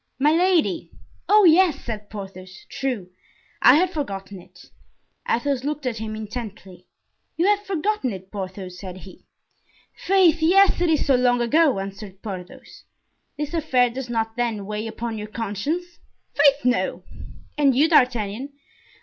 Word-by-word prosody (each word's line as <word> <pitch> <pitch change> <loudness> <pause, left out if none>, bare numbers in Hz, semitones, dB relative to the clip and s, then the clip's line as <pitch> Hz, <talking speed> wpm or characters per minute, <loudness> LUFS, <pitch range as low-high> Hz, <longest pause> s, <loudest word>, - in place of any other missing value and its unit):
"Milady." 330 +4 +2 0.4
"Oh, 425 0 +6
yes!" 335 -3 +5
said 210 -3 -6
Porthos; 190 -3 -10
"true, 240 -10 -3 0.5
I 250 - +8
had 355 +3 +2
forgotten 195 - -5
it!" - - -19 0.6
Athos 260 +1 0
looked 295 0 -3
at 235 -3 -2
him 215 -1 -5
intently. 210 -5 -8 0.5
"You 335 - +2
have 410 0 +1
forgotten 390 - -1
it, 190 -1 -9
Porthos?" 185 -2 -7
said 185 -2 -8
he. 185 0 -14 0.7
"Faith! 370 -4 +3
yes, 375 +3 +4
it 350 - +2
is 310 -2 +2
so 275 - +3
long 245 -1 +3
ago," 280 +2 +3
answered 195 0 -8
Porthos. 185 -4 -9 0.5
"This 295 +2 -4
affair 260 -7 +2
does 255 0 -6
not, 225 -1 -2
then, 230 -4 -2
weigh 210 +2 -4
upon 225 0 -5
your 210 - -6
conscience?" 240 - -4 0.3
"Faith, 285 -2 +3
no." 250 0 0 0.5
"And 280 -3 +3
you, 290 +5 +4
D'Artagnan?" 250 -3 +1
245 Hz, 140 wpm, -23 LUFS, 205-310 Hz, 0.7 s, I